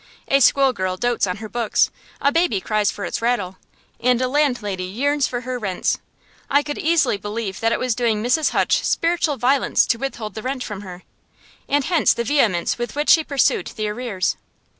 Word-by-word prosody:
A 275 - +3
school 275 0 +4
girl 185 -4 -2
dotes 240 -1 0
on 180 - -3
her 215 +1 -7
books, 230 0 +1 0.3
a 280 - +2
baby 330 - +1
cries 210 +2 0
for 200 - -5
its - - -3
rattle, 205 -6 -1 0.4
and 250 0 +2
a 255 - +1
landlady 245 -10 0
yearns 275 +8 0
for 245 -1 -4
her 255 0 -4
rents. 195 -5 -1 0.5
I 285 +1 +3
could 290 0 -5
easily 310 -9 +2
believe 205 -1 -5
that 225 0 +1
it - - +1
was 255 -2 0
doing 225 -2 0
Mrs. 255 +6 +2
Hutch - - +1
spiritual 335 -4 +1
violence 260 +3 +2
to 230 - 0
withhold 235 -6 -5
the 220 - -6
rent 255 +2 -3
from 205 -2 -6
her; 185 -2 -10 0.7
and 290 0 +2
hence 340 +3 +3
the 235 - -1
vehemence 230 -9 +1
with 240 +2 -4
which 295 +1 +2
she 320 - +6
pursued 280 -3 +1
the 215 -2 -2
arrears. 210 -4 -2
240 Hz, 195 wpm, -21 LUFS, 210-275 Hz, 0.7 s, she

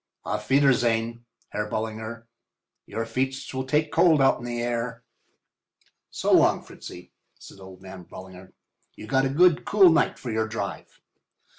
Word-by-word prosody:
Auf 105 0 -4
wiedersehen, 120 -4 +2 0.2
Herr 105 0 -3
Ballinger—your 115 +1 -7
feets 130 +4 -3
will 130 0 -4
take 150 +3 +1
cold 160 -4 +4
out 135 0 +3
in 120 - -8
the 120 0 -4
night 120 - -2
air." 120 0 -3 1.1
"So - - -1
long, - - +4
Fritzy," 90 - -12 0.3
said - - -14
old 95 0 -13
man 95 -2 -11
Ballinger. 95 0 -12 0.4
"You - - -10
got 135 +3 +1
a - - -3
nice 170 +3 +4
cool 195 -4 +5
night 160 - +2
for 120 - -6
your 110 0 -1
drive." 110 +1 -6
115 Hz, 150 wpm, -25 LUFS, 110-135 Hz, 1.1 s, cool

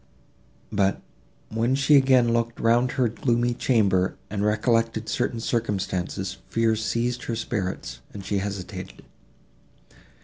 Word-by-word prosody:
But, 100 -2 +1 0.5
when 115 +4 +1
she 140 +2 +4
again 130 -4 +5
looked 115 0 -1
round 120 +2 +3
her 130 -3 +2
gloomy 120 +1 0
chamber, 100 -7 +2 0.2
and 105 -1 -1
recollected 115 +1 +1
certain 120 +2 -1
circumstances, 95 -5 -2
fear 115 -1 +2
seized 115 +3 -1
her 115 - -2
spirits, 105 -4 -3
and 100 -2 -9
she 100 0 0
hesitated. 100 -2 -6
115 Hz, 115 wpm, -25 LUFS, 100-120 Hz, 0.5 s, again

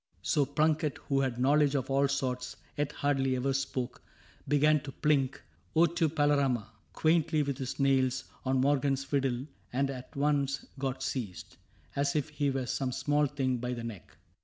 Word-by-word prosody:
So 130 - +2
Plunket, 150 0 +1
who 135 -1 -1
had 130 -3 0
knowledge 145 +3 +3
of 130 -1 -1
all 140 +1 +3
sorts. 130 -2 -2 0.2
Yet 145 -1 -1
hardly 135 -2 +1
ever 135 +2 0
spoke, 130 -2 -3 0.5
began 150 +1 +4
to 140 0 -8
plink 135 -3 +1 0.4
O 160 - +5
tu^ 170 0 +3
PalertM! 145 -6 +2 0.2
— - - -36
quaintly, 160 -1 +2
with 140 -1 -3
his 130 +1 -4
nails, 130 -1 +2
— - - -30
On 130 0 +2
Morgan's 135 0 +2
fiddle, 135 -2 0 0.3
and 135 +2 0
at 130 +3 -9
once 140 -1 +1
got 135 -1 -2
seized, 105 -9 -4 0.4
As 140 +1 +1
if 150 0 0
he 145 -1 0
were 135 -1 -1
some 130 +1 -1
small 145 +3 +1
thing, 130 -3 -1
by 125 +1 -3
the 120 -1 -5
neck. 115 -6 -8
135 Hz, 175 wpm, -30 LUFS, 130-145 Hz, 0.5 s, O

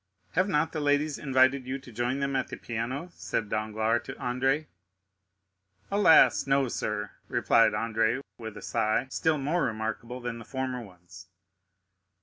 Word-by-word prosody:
"Have 185 +4 +1
not 150 -2 +1
the 155 - -3
ladies 145 0 +1
invited 130 -1 +3
you 130 +1 -2
to 130 -2 -13
join 120 +4 -1
them 140 0 -1
at 130 - 0
the - - -7
piano?" 125 +8 -4
said 105 -9 -3
Danglars 110 +2 0
to - - -7
Andrea. 135 +4 0 1.3
"Alas, 200 -8 +6
no, 135 -1 +3
sir," 105 -2 -3 0.2
replied - - +3
Andrea 115 +2 0 0.2
with 110 -2 -7
a - - -9
sigh, 110 +4 +1
still 160 -1 +1
more 150 +5 0
remarkable 110 +1 -3
than 120 -1 -5
the - - -9
former 130 -1 -3
ones. 90 -3 -14
125 Hz, 150 wpm, -28 LUFS, 110-140 Hz, 1.3 s, Alas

